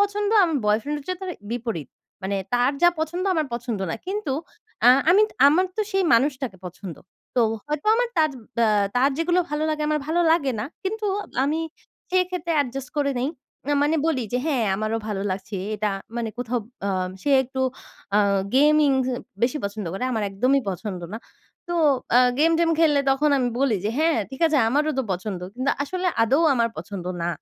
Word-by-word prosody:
পছন্দ 405 0 +1
আমার 325 -4 0
boyfriend 220 +8 +1
হচ্ছে 365 +6 -4
তার 375 - -4 0.2
বিপরীত। 230 - -4 0.3
মানে 195 +1 -1 0.2
তার 245 +3 +3
যা 350 - +8
পছন্দ 345 +4 -2
আমার 315 -2 0
পছন্দ 235 -3 -3
না। - - -1
কিন্তু 385 -7 -2 0.5
অ্যা 245 - +8 0.2
আমি 395 +4 +6 0.3
আমার 355 +6 +3
তো - - 0
সেই 385 -1 +2
মানুষটাকে 260 -3 0
পছন্দ। 180 -2 -8 0.4
তো - - +5 0.3
হয়তো 295 +2 -3
আমার 485 +1 +1
তার 310 -1 +3 0.3
ব্যা 215 +1 +2
যেগুলো 345 +3 +2
ভালো, 300 +1 -1
লাগে 305 0 -2
আমার 305 0 +1
ভালো 335 +2 +1
লাগে 285 -6 +1
না। - - -2 0.2
কিন্তু 430 +2 -2 0.4
আমি 300 +3 0 0.5
সেক্ষেত্রে 360 -2 0
adjust 270 +1 -7
করে 285 -1 +1
নেই। 260 - 0 0.4
না 290 - +1
মানে 300 +2 +2
বলি 275 -6 +1
যে 250 - +1
"হ্যাঁ 270 -7 +1
আমারও 215 +2 -1
ভালো 200 -2 -2
লাগছে 195 +2 -4 0.2
এটা।" 210 0 -1 0.3
মানে 235 -1 -2
কোথাও 245 0 -1 0.3
আ - - 0 0.3
সে 290 - 0
একটু 265 +1 -5 0.6
আ - - +6 0.4
gaming 295 0 +5 0.5
বেশি 250 +5 +2
পছন্দ 200 -1 -4
করে, 195 +6 -3
আমার 220 -2 -1
একদমই 255 +8 +2
পছন্দ 185 0 -5
না। 220 - -4 0.5
তো 345 - -2 0.4
আ - - +8 0.2
game 325 +2 +4
টেম 335 -1 +3
খেললে 300 -3 +4
তখন 285 +3 +2
আমি 250 -2 +1
বলি 270 -6 +2
যে 215 - +1
"হ্যাঁ 320 0 +3
ঠিক 265 - -9
আছে 315 -2 +2
আমারও 295 +6 +1
তো - - +2
পছন্দ।" 185 0 -4
কিন্তু 260 +3 0
আসলে 365 +6 -3 0.2
আদৌ 260 +7 +3
আমার 235 -2 +2
পছন্দ 185 +2 -6 0.2
না। 170 - 0
275 Hz, 180 wpm, -24 LUFS, 225-320 Hz, 0.6 s, যা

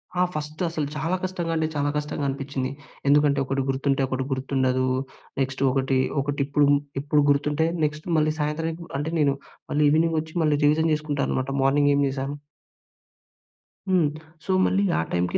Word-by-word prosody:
హా! 180 - +2
ఫస్టు 155 +2 -4
అసలు 155 -3 -2
చాలా 160 +5 0
కష్టంగా 175 -3 -2
అంటే, 160 -1 +1
చాలా 145 0 +1
కష్టంగా 150 -1 -3
అనిపిచ్చింది. 135 -1 -3 0.4
ఎందుకంటే, 145 0 +4
ఒకటి 135 +1 -1
గుర్తుంటే, 135 +1 +1
ఒకటి 130 0 -2
గుర్తుండదు. 130 -1 0 0.6
నెక్స్ట్ 135 0 -1
ఒకటి, 135 0 +1 0.2
ఒకటిప్పుం 145 +1 +1 0.3
టిప్పూ 145 +2 +2
గుర్తుంటే, 145 +3 +2 0.2
నెక్స్ట్ 155 +2 -4
మళ్ళీ 155 0 +2
సాయంత్రంకి 160 +3 -2
అంటే, 150 +3 -2
నేను 140 -2 +3 0.4
మళ్ళీ 150 +1 +2
ఈవినింగొచ్చి, 160 0 +1
మళ్ళీ 150 -2 +3
రివిజన్ 160 +2 +3
చేసుకుంటా 150 -2 -2
అనమాట 130 +1 -1
మార్నింగ్ 145 +1 +4
ఏం 140 - +2
జేశాను. 135 +1 -3 1.5
హ్మ్. 175 -5 +3 0.4
సో, - - -1
మళ్ళీ 195 +1 +2
ఆ - - +2
టైంకి 90 0 0
145 Hz, 150 wpm, -25 LUFS, 135-155 Hz, 1.5 s, ఎందుకంటే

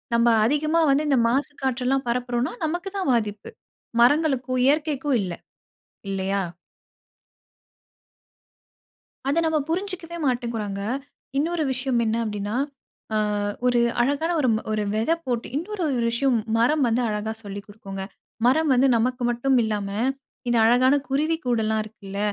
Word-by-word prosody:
நம்ம 235 0 +4 0.2
அதிகமா 305 +6 +2
வந்து 290 +2 +2
இந்த 270 -3 +4
மாசு 270 +5 +1
காற்றுல்லாம் 265 +1 0
பரப்புறோன்னா, 245 +1 -1
நமக்கு 350 +5 -2
தான் 380 -7 -1
பாதிப்பு. 210 -3 -2 0.5
மரங்களுக்கும், 260 -1 +3
இயற்கைக்கும் 290 -2 +1
இல்ல, 185 -3 -3 0.8
இல்லையா? 195 0 -1 2.9
அத 300 +4 +3
நம்ம 320 -1 +2
புரிஞ்சுக்கவே 345 -1 -3
மாட்டேங்குறோங்க. 235 -5 -2 0.6
இன்னொரு 325 +2 0
விஷயம் 260 -2 0
என்ன 220 0 0
அப்படீன்னா, 210 -1 -3 0.6
அ - - +2 0.5
ஒரு 245 -1 +3 0.2
அழகான 285 +6 0
ஒரு 260 - +2
ம் 220 - -1
ஒரு 215 0 0
வெதை 225 +9 +2
போட்டு 240 -2 -1
இன்னொரு 370 +5 -3
ஒரு 260 -4 0
விஷயம் 245 +1 +2 0.2
மரம் 285 +6 +3
வந்து 230 +2 +1
அழகா 210 +1 -2
சொல்லி 200 0 -6
குடுக்குங்க. 195 -2 -8 0.4
மரம் 310 +4 +3
வந்து 255 +2 +4
நமக்கு 250 +2 0
மட்டும் 255 +3 +1
இல்லாம, 210 -2 -2 0.6
இந்த 240 - +2
அழகான 250 +4 +5
குருவிக்கூடெல்லாம் 250 -7 0
இருக்குல்ல, 200 -2 -9
250 Hz, 125 wpm, -24 LUFS, 220-290 Hz, 2.9 s, அழகான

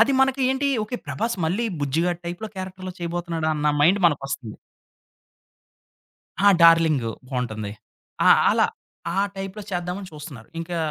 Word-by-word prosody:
అది 275 - +3
మనకి 265 0 +2
ఏంటి 270 +1 0 0.2
ఓకే 245 +3 -4
ప్రభాస్ 230 +2 -2
మళ్ళీ 200 +8 0 0.2
బుజ్జిగాడు 165 +5 0
టైప్‌లో 175 +6 -5
క్యారెక్టర్‌లో 185 0 -6
చేయబోతున్నాడు 170 -1 -3
అన్న 150 0 +1
మైండ్ 185 +7 +4
మనకొస్తుంది. 135 -7 -2 1.9
ఆ! 205 - +6
డార్లింగూ 160 -8 +5 0.2
బాగుంటుంది. 110 -5 -3 0.6
ఆ! - - +8 0.2
అలా - - +4 0.5
ఆహ్, 195 +2 +1
టైప్‌లో 195 +2 -5
చేద్దామని 180 +2 -3
చూస్తున్నారు. 150 -7 -10
ఇంకా 170 +1 -4
175 Hz, 125 wpm, -24 LUFS, 150-195 Hz, 1.9 s, ఆ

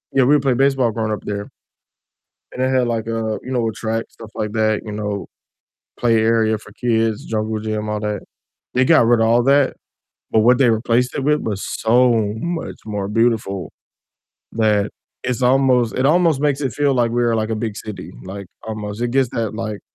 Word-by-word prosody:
yeah, 135 - +5
we 145 +4 +5
would 150 - +2
play 130 - +4
baseball 135 -2 +2
growing 110 0 -2
up 105 - -3
there, 100 0 -4 1.0
and 125 - -4
it 130 - +2
had, 125 - +2
like, 110 0 -4
a, 110 -1 -2
you 130 - -6
know, 120 -3 0
a - - -1
track, 115 +1 -2
stuff 115 -1 -13
like 105 -1 -3
that, 110 0 +2
you 110 - -6
know, 105 -1 -3 0.7
play 115 -2 +3
area 110 -1 +2
for 105 - -15
kids, 115 -2 0
jungle 110 0 -2
gym, 110 0 -3
all 105 0 -1
that. 105 -1 -2 0.5
They 130 - +3
got 155 -5 +5
rid 120 -1 +4
of 110 - +3
all 120 +1 +4
that, 140 +1 +3 0.6
but 110 - +4
what 125 +3 +5
they 130 - +5
replaced 115 +2 +1
it 135 - -2
with 150 +1 +2
was 100 -3 -2 0.2
so 115 -2 +3
much 170 +4 -4
more 105 -2 -3
beautiful 105 -6 0 0.8
that 105 -2 +1 0.3
it's 125 -1 -2
almost 125 -2 +3
it 130 - +3
almost 165 -3 +3
makes 145 -1 +1
it 135 -5 -1
feel 140 +3 +1
like 120 -2 +2
we 120 0 +1
are, 115 -1 +2
like, 110 0 -1
a 110 - -1
big 105 -1 -6
city, 105 -2 -7
like, 100 0 -7 0.2
almost. 105 0 -5
It 120 - 0
gives 135 -3 +2
that, 115 -2 -2
like 110 -2 -4
115 Hz, 205 wpm, -20 LUFS, 110-125 Hz, 1.0 s, yeah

